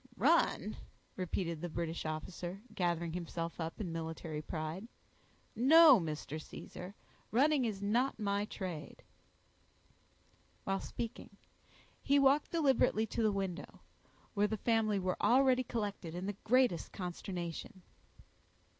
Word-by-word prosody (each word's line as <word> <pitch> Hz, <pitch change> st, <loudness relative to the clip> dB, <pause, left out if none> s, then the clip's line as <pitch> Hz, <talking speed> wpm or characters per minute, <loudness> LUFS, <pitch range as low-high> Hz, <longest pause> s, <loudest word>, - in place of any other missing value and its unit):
"Run!" -, -, +2 dB, 0.4 s
repeated 170 Hz, -3 st, -2 dB
the 175 Hz, -, -3 dB
British 165 Hz, 0 st, -3 dB
officer, 175 Hz, +5 st, -5 dB
gathering 170 Hz, -3 st, -1 dB
himself 170 Hz, -1 st, -4 dB
up 160 Hz, 0 st, -4 dB
in 185 Hz, -6 st, -3 dB
military 160 Hz, -1 st, -4 dB
pride. 160 Hz, +6 st, -5 dB, 0.7 s
"No, 285 Hz, +2 st, +8 dB
Mr. 155 Hz, -2 st, -4 dB
Caesar, 180 Hz, +5 st, -9 dB, 0.3 s
running 275 Hz, +2 st, +3 dB
is 205 Hz, -3 st, -3 dB
not 240 Hz, +6 st, +1 dB
my 200 Hz, -1 st, 0 dB
trade." 180 Hz, -7 st, -6 dB, 1.6 s
While 195 Hz, 0 st, 0 dB
speaking, 230 Hz, -3 st, -6 dB, 0.6 s
he 280 Hz, -, +3 dB
walked 275 Hz, +1 st, +4 dB
deliberately 270 Hz, -8 st, +3 dB
to 225 Hz, -, -3 dB
the 215 Hz, -1 st, +3 dB
window, 190 Hz, -3 st, -4 dB, 0.5 s
where 205 Hz, 0 st, +2 dB
the 220 Hz, -, -2 dB
family 220 Hz, -1 st, +2 dB
were 185 Hz, -1 st, -1 dB
already 255 Hz, 0 st, +4 dB
collected 205 Hz, -8 st, -4 dB
in 180 Hz, +1 st, -4 dB
the 205 Hz, -, -2 dB
greatest 245 Hz, -8 st, +3 dB
consternation. 180 Hz, +1 st, -5 dB
195 Hz, 120 wpm, -34 LUFS, 170-230 Hz, 1.6 s, No